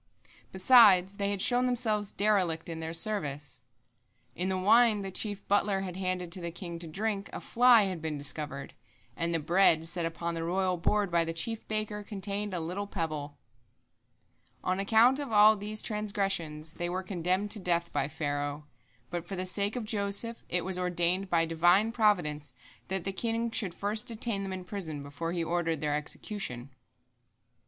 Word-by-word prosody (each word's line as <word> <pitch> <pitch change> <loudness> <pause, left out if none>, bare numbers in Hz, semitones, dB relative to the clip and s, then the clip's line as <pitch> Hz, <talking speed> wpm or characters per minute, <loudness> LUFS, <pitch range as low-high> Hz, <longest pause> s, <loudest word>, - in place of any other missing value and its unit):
Besides, 190 -2 +6
they 200 0 0
had 200 -2 -1
shown 250 0 +3
themselves 220 -5 0
derelict 185 -6 +1
in 165 -1 -5
their 160 0 -4
service. 150 - -3 0.7
In 185 +2 -2
the 190 - 0
wine 215 +2 +4
the 195 - -5
chief 205 +1 -4
butler 200 -1 +2
had 185 -2 -5
handed 185 -2 -3
to 185 +1 0
the 170 - -4
king 170 0 -7
to 170 - -6
drink, 200 +4 -3
a - - -5
fly 240 -2 +5
had 185 -4 -3
been 155 -2 -3
discovered, 140 -1 -4 0.4
and 170 0 -1
the 165 - +1
bread 165 0 +4
set 170 +1 -2
upon 170 +1 -4
the 165 0 -4
royal 185 +2 0
board 200 +3 0
by 170 -1 +3
the 165 0 -4
chief 225 +7 -3
baker 215 -1 -3
contained 205 0 -4
a 180 - -2
little 180 +5 -4
pebble." 155 -6 -4 1.3
On 185 +1 0
account 225 +7 +4
of 285 -4 -4
all 215 0 +7
these 210 +1 -2
transgressions 195 -8 -2
they 175 +1 -3
were 185 +2 -3
condemned 185 +2 -1
to 220 - +2
death 170 -2 0
by 135 - 0
Pharaoh, 145 0 -3 0.5
but 175 -1 -4
for 195 - -4
the 185 0 -3
sake 200 +4 0
of 245 -3 -3
Joseph 210 +2 -1
it 180 -1 0
was 185 -1 -2
ordained 180 +1 +1
by 165 -2 +3
Divine 175 +7 +3
providence 160 - +1 0.3
that 190 -2 -2
the 195 - -3
king 230 +3 -1
should 195 -6 -2
first 210 +2 -1
detain 230 -3 -1
them 195 -1 -4
in 185 -1 -6
prison 170 -6 -6
before 145 +4 -5
he 170 -1 -1
ordered 165 -1 -1
their 150 0 -1
execution. 150 - -4
185 Hz, 180 wpm, -29 LUFS, 165-210 Hz, 1.3 s, all